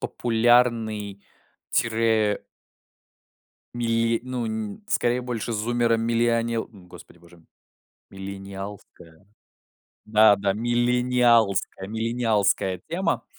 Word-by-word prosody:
популярной, 115 -4 +1 0.5
тире 110 -2 +1 1.3
мили 115 -1 0
ну, 125 -2 -3
н 110 - -5
скорее 120 -6 +1
больше 120 -2 -4
зуммера-милиони 115 +1 +1
м, 100 -5 -7
господи 90 - -15
боже, 85 0 -19 0.7
миллениалская. 95 -3 -9 0.8
Да-да, 105 -2 +4
миллениалская 120 -3 +1
миллениалская 110 -4 0
тема, 175 +4 -1
115 Hz, 70 wpm, -24 LUFS, 100-120 Hz, 1.3 s, Да-да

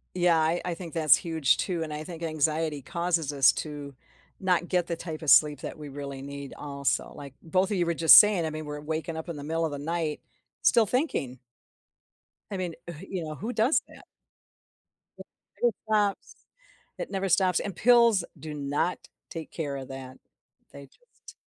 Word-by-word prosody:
Yeah, 175 -2 +3
I 160 +2 +1
I 175 - -1
think 170 -2 -9
that 160 -2 -2
is 140 - +8
huge 160 -5 +1
too, 175 -4 -2
and 155 - -6
I 150 +1 -5
think 170 0 -9
anxiety 155 -1 -1
causes 170 -2 -1
us 135 -1 +6
to 145 -3 -6 0.4
not 180 -2 +1
get 180 -2 0
the 170 - -2
type 160 -1 -7
of 155 - -2
sleep 150 +1 +5
that - - -6
we 150 -2 -8
really 140 -1 -7
need 140 0 -8
also, 140 -1 -2
like 140 -2 -10
both 185 +5 0
of 200 - 0
you 175 - +2
were 170 - 0
just 165 0 +8
saying, 205 -6 +4
I - - -1
mean, 155 0 -6
we're 150 0 -6
waking 160 +2 -4
up 160 +2 -6
in 160 - -5
the 145 - -7
middle 165 +2 -1
of 155 - -3
the 145 - -4
night 160 0 -2 0.4
still 230 -2 +5
thinking. 195 - -1 1.1
I 195 - -3
mean, 180 -3 -3
e - - -5
wh 160 +1 -11
you 185 -4 -3
know, 155 0 -6
who 225 - -5
does 240 +7 +3
that? - - -15 1.1
It - - -10 0.4
never 240 -1 +4
stops, 210 -2 0 0.6
it - - -5
never 195 -1 -2
stops, 185 -1 +3
and 195 -4 -5
pills 235 -5 +5 0.2
do 155 -1 -7
not 145 +4 -2 0.2
take 165 -1 -7
care 145 -4 -4
of 135 - -7
that, 130 -1 -9 0.5
they 140 0 -11
just - - -18
160 Hz, 200 wpm, -27 LUFS, 145-180 Hz, 1.1 s, is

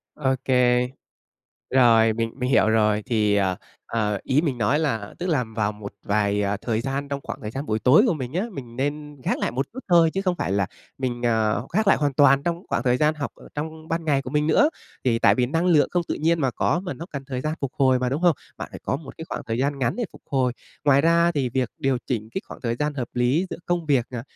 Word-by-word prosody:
Ô 135 -3 +1
kê. 125 -1 +3 0.9
Rồi, 115 -3 +5
mình 115 0 -2
mình 125 -1 -2
hiểu 110 - +4
rồi, 105 -1 +2
thì, 105 -4 +2
ờ, 95 -2 +1 0.3
ờ, 105 -3 -1
ý 135 +3 +2
mình 140 -7 -2
nói 125 +7 +2
là 115 -10 -2
tức 180 - -3
là 150 -8 +1
vào 105 -1 +1
một 105 -1 -9
vài, 105 0 +1
ờ, 100 0 0
thời 115 -2 -1
gian 135 +3 -3
trong 140 0 -3
khoảng 145 -3 -6
thời 105 - -4
gian 135 +5 -5
buổi 110 -3 0
tối 130 - +6
của 205 - +2
mình 130 -4 -5
á, 185 +7 -1
mình 120 -7 -9
nên 145 +1 -3
gác - - 0
lại - - -1
một 135 +3 -2
chút 255 - -10
thôi 170 -2 +5
chứ 195 - 0
không 185 -2 +1
phải 95 - -2
là 100 -1 +1 0.3
mình, 125 -2 -3
à, 110 -2 +2 0.2
khác 215 +4 +1
lại - - +6
hoàn 145 -2 0
toàn 140 0 +5
trong 170 +2 -2
khoảng - - 0
thời 125 -2 +2
gian 150 +3 +2
học 145 -2 -4
ở - - -15
trong 155 +1 -6
ban 165 0 -2
ngày 140 -3 +1
của 130 - -7
mình 150 +1 +1
nữa. 290 - +4 0.3
Thì 115 -2 +2
tại - - +5
vì 125 -1 +1
năng 165 +6 0
lượng 160 -5 +4
không 175 - +1
tự - - 0
nhiên 165 +1 +1
mà 135 - +2
có, 160 +7 0
mà 180 -1 -5
nó 170 - -8
cần 140 -1 -5
thời 130 -2 -4
gian 155 +3 -2
phục 140 -2 -3
hồi 130 -2 +4
mà, 125 - 0
đúng 140 +6 -2
hông? 175 -5 +4 0.2
Bạn - - -6
phải - - -9
có - - -1
một 140 -1 -11
cái 160 - -6
khoảng - - -4
thời 115 0 -2
gian 140 +2 0
ngắn 125 -3 0
để 240 - -1
phục - - -15
hồi. 130 -3 +1 0.3
Ngoài 140 -1 +5
ra 170 +2 +3
thì 140 -5 0
việc 125 -1 -1
điều 135 -2 +1
chỉnh 110 -3 -2
cái 190 - -1
khoảng - - -11
thời 115 -1 -2
gian 150 +2 -1
hợp 125 -4 -3
lý 125 +9 +2
giữa - - -4
công 175 -2 -1
việc, 135 -5 +3
à, 120 -2 -5
135 Hz, 265 wpm, -24 LUFS, 120-155 Hz, 0.9 s, tối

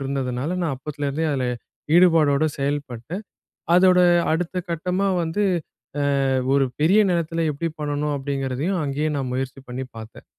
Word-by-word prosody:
இருந்ததுனால 135 +3 -2
நான் 160 -5 0
அப்போத்துலேருந்தே 145 +2 -3
அதில 130 -2 -1 0.5
ஈடுபாடோட 160 -5 +5
செயல்பட்டு, 140 0 -3 0.6
அதோட 180 0 +6 0.3
அடுத்த 180 +2 -1
கட்டமா 180 +4 0
வந்து, 165 +6 -1 0.6
அ - - +1 0.5
ஒரு 140 -1 +4 0.2
பெரிய 185 +8 +5
நிலத்தில 165 -1 0
எப்படி 165 +4 -3
பண்ணணும்? 145 0 -1
அப்டீங்கிறதையும் 140 +6 -2
அங்கேயே 145 +2 -1
நான் 130 -2 -3
முயற்சி 135 +1 -4
பண்ணி 125 +2 -4
பார்த்தேன். 110 0 -11
145 Hz, 125 wpm, -23 LUFS, 135-170 Hz, 0.6 s, அதோட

